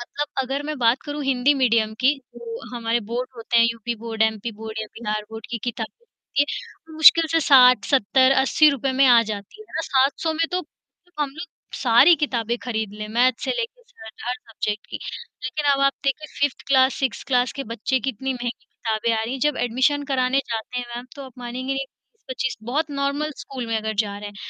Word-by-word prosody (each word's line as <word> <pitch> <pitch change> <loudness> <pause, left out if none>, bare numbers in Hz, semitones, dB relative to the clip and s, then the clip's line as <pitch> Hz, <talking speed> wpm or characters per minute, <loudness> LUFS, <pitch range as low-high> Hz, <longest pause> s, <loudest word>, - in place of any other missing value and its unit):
मतलब 290 +4 -4 0.2
अगर 270 +2 -3
मैं 305 0 -3
बात 235 +1 +3
करूँ, 290 0 -4
हिंदी 270 +1 +3
मीडियम 230 -5 +2
की, 265 +3 +4 0.2
जो 230 -1 -7 0.2
हमारे 230 0 0
बोर्ड 250 +2 -2
होते 230 +1 -1
हैं, 230 - +6
यूपी 230 +1 -4
बोर्ड, 225 -1 -1
एमपी 220 +1 0
बोर्ड, 220 0 -6
या 220 - -4
बिहार 215 -2 -2
बोर्ड, 220 -1 -8
की 235 - -2
किताब 230 -2 -3
होती 475 -10 -5
है, 315 +2 -7
मुश्किल 320 +1 +8
से 330 - +4
60-70-80 265 +2 +5
रुपए 270 -1 -1
में 275 - +7
आ 240 -2 +7
जाती 205 - -9
हैं, 430 - -12
है - - -19
ना? - - +1
700 275 +4 +2
में 330 +1 0
तो 365 - +1
तो 355 -2 -10
हम 285 - -2
लोग 315 +5 -8 0.4
सारी 250 +7 +7
किताबें 240 -6 -1
खरीद 220 -4 -3
लें, 210 0 -6
मैथ्स 240 +2 +2
से - - -1
लेके 485 0 -3
सरट 465 - -14
हर 245 - 0
सब्जेक्ट 215 -3 -5
की। - - -6 0.5
लेकिन 265 +4 -3
अब 275 - 0
आप 275 - +4
देखिए, 275 +3 -1
5th 285 -2 0
class, 265 -1 +4
6th - - -7
sixth 265 -2 -2
class 250 -2 +2
के 275 - -4
बच्चे 260 +4 0
की 270 - -1
इतनी 265 +3 -3
महँगी 245 -1 -3 0.2
किताबें 225 0 -2
आ - - -1
रही 225 +3 -3
हैं, 265 - -4
जब 295 0 +2
एडमिशन 260 +5 +1
कराने 260 0 +2
जाते 230 +2 -3
हैं 245 - -3
मैम, 245 +1 -7
तो 280 - -7
आप 260 - -12
मानेंगी 250 +2 -4
नहीं। 270 0 -2
20-25 265 - -6
बहुत 290 +7 -1
नॉर्मल 280 +2 -1
स्कूल 255 -4 -6
में 225 - -1
अगर 220 0 -3
जा 200 -1 -6
रहे 205 0 -7
हैं, 205 - -13
255 Hz, 215 wpm, -23 LUFS, 230-280 Hz, 0.5 s, मुश्किल